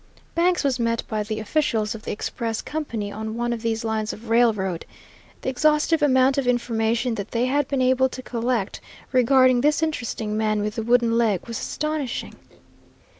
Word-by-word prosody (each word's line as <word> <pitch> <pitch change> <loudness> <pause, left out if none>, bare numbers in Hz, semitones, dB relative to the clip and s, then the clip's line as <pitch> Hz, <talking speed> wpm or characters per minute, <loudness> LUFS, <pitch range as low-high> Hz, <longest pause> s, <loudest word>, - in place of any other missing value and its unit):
Banks 350 +1 +2
was 265 -3 +1
met 230 -1 0
by 215 -1 -2
the 215 +1 -3
officials 225 -3 0
of 225 - -8
the - - -5
express 225 +1 -3
company 230 -10 -4
on 220 +1 -5
one 240 0 0
of 230 - -5
these 225 0 -1
lines 220 -1 -1
of 225 +1 -10
railroad. 210 -7 +2 0.6
The - - 0
exhaustive 300 +4 +2
amount 265 -1 +4
of 265 - -2
information 235 0 +1
that 200 -3 -5
they 235 +1 0
had 285 +3 +1
been 275 -2 0
able 260 +1 +3
to 255 - -8
collect 235 -4 -2 0.3
regarding 255 0 +4
this 300 +3 +2
interesting 235 -8 -2
man 215 -1 +1
with 210 0 -2
the 225 - -3
wooden 235 0 +3
leg 215 -6 +1
was 230 -1 -5
astonishing. 305 -5 -3
235 Hz, 175 wpm, -23 LUFS, 220-260 Hz, 0.6 s, amount